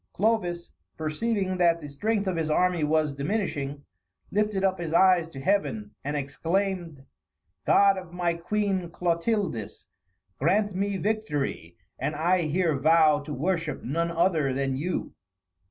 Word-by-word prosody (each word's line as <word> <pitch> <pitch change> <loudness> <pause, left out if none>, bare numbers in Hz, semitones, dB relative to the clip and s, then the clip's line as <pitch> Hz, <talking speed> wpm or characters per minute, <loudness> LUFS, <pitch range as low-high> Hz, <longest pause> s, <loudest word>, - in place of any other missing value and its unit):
Clovis, 180 -5 0 0.3
perceiving 185 +4 -1
that 170 -2 +3
the 150 - -8
strength 205 +9 -1
of 190 -2 -1
his 160 -1 -1
army 180 +1 +2
was 155 -1 +1
diminishing, 145 -3 -2 0.5
lifted 210 -1 0
up 190 -1 +1
his 165 -2 -4
eyes 180 -2 +5
to 145 -5 -10
Heaven, 205 +5 0
and 145 +1 -2
exclaimed, 165 +1 -2 0.6
"God 195 -1 +5
of 180 -2 -12
my 175 -1 0
Queen 190 +1 -1
Clotildis, 170 - -2 0.5
grant 200 +7 +2
me 200 +1 -1
victory, 210 -8 -2 0.2
and 150 - -2
I 175 +4 +2
here 165 0 +1
vow 155 0 +5
to 150 +1 -8
worship 165 +2 -2
none 165 +6 -1
other 165 -5 +1
than 135 -1 -1
you." 170 +7 -3
170 Hz, 140 wpm, -27 LUFS, 155-195 Hz, 0.6 s, eyes